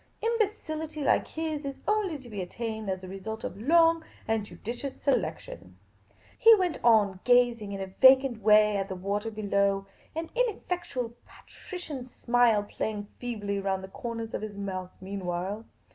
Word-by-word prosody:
Imbecility 325 -10 -1
like - - +3
his 315 -2 -3
is 275 -1 -4
only 420 -7 +1
to 260 -3 -13
be 205 -4 -5
attained 220 +2 -4
as 185 -1 -2
the 185 - -8
result 205 +4 -6
of 200 - -5
long 330 +4 +4 0.2
and 220 -2 0
judicious 245 +6 -6
selection. 95 - -2 0.6
He 455 0 +9
went 365 -5 -1
on 210 -5 +4
gazing 240 -4 +3
in 195 - -4
a - - -2
vacant 260 +4 +5
way 210 0 +5
at 195 0 -2
the 190 - -3
water 200 +4 -2
below, 200 -2 +1 0.3
an 325 0 -3
ineffectual 355 - -2
patrician 315 -8 -8
smile 240 -3 +2
playing 205 0 -4
feebly 205 -5 -3
round 190 -1 -1
the 190 - -8
corners 230 +1 -5
of - - -3
his 210 -2 -6
mouth 185 -2 -4
meanwhile. 190 +2 -4
225 Hz, 155 wpm, -28 LUFS, 200-280 Hz, 0.6 s, He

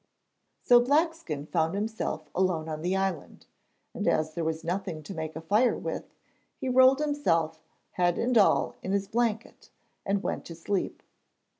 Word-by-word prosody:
So 245 -1 +7
Blackskin 285 - 0
found 165 +1 0
himself 210 -7 -3
alone 180 -4 0
on 155 -1 -4
the 180 +3 0
island, 190 -4 -3 0.5
and - - -3
as 155 0 +1
there 170 - -3
was 160 0 -2
nothing 170 -2 -3
to 170 - -7
make 160 -2 -5
a 160 - -5
fire 210 +9 +2
with, - - -6 0.4
he 265 - -3
rolled 260 +1 +6
himself, 175 - 0 0.3
head 175 -1 +1
and 245 +1 0
all 215 - +3
in 190 - -3
his 200 -1 0
blanket, 230 0 -2 0.3
and 200 0 -1
went - - -2
to 165 - -8
sleep. 185 +4 -3
190 Hz, 160 wpm, -28 LUFS, 160-235 Hz, 0.5 s, So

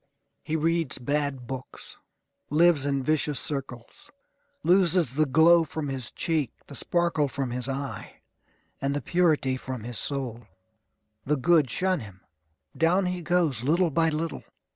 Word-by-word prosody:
He 155 - -3
reads 165 -2 +1
bad 140 -1 -2
books. 130 +1 -8 0.5
Lives 155 -2 +4
in 140 -1 0
vicious 150 -2 0
circles. 130 -4 -7 0.5
Loses 175 -4 +3
the 155 +2 +2
glow 165 +4 +6
from 155 -2 -5
his 130 -4 -4
cheek, 155 -7 -1
the - - -12
sparkle 170 0 0
from 135 -2 -3
his 125 +1 -3
eye, 135 +1 -6 0.6
and 140 +1 0
the 145 - -2
purity 155 -7 +2
from 130 -3 -6
his 120 0 -4
soul. 120 -5 -3 0.8
The 150 +1 +2
good 155 0 +3
shun 185 - 0
him. 100 -4 -11 0.5
Down 175 +4 +2
he 180 0 -2
goes, 165 -8 +1
little 165 +5 +2
by 165 +3 +2
little. 160 +1 -3
145 Hz, 140 wpm, -26 LUFS, 130-165 Hz, 0.8 s, glow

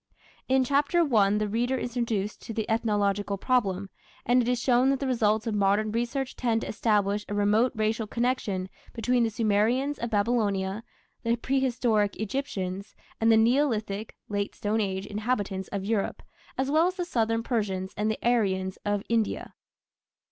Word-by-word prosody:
" - - -30
In 265 0 +4
Chapter 285 +6 +2
I 200 -2 +5
the 210 0 0
reader 240 +5 0
is 240 -1 -5
introduced 215 -4 -2
to 225 - -4
the 220 - -2
ethnological 205 -3 0
problem, 195 -5 0 0.3
and 245 +1 +4
it 235 - -2
is 250 -1 +1
shown 250 +1 +3
that 275 -1 +1
the 275 - -2
results 220 -4 +1
of 225 - -1
modern 205 +1 +2
research 240 +4 -2
tend 230 -2 0
to - - -5
establish 210 -2 +1
a 205 - -2
remote 210 +4 +3
racial 220 0 0
connection 220 -5 -1 0.3
between 245 +2 +1
the 225 - +1
Sumerians 225 +6 +1
of 235 - -3
Babylonia, 205 -2 0 0.4
the 230 0 +1
prehistoric 240 -5 +1
Egyptians, 200 -5 -4 0.2
and 225 0 +4
the 220 - +6
Neolithic 225 -4 +1
(Late 205 -1 -2
Stone 215 +2 0
Age) 190 -1 -2
inhabitants 205 -3 -2
of 195 -1 -4
Europe, 210 -1 -1 0.3
as 265 +1 0
well 320 +3 +4
as 365 - -2
the 360 -2 -2
southern 225 -6 0
Persians 195 -6 -2
and 210 +1 0
the 220 - -1
"Aryans" 190 -5 +1
of 205 -1 -1
India. 230 -2 -1
220 Hz, 170 wpm, -27 LUFS, 205-245 Hz, 0.4 s, the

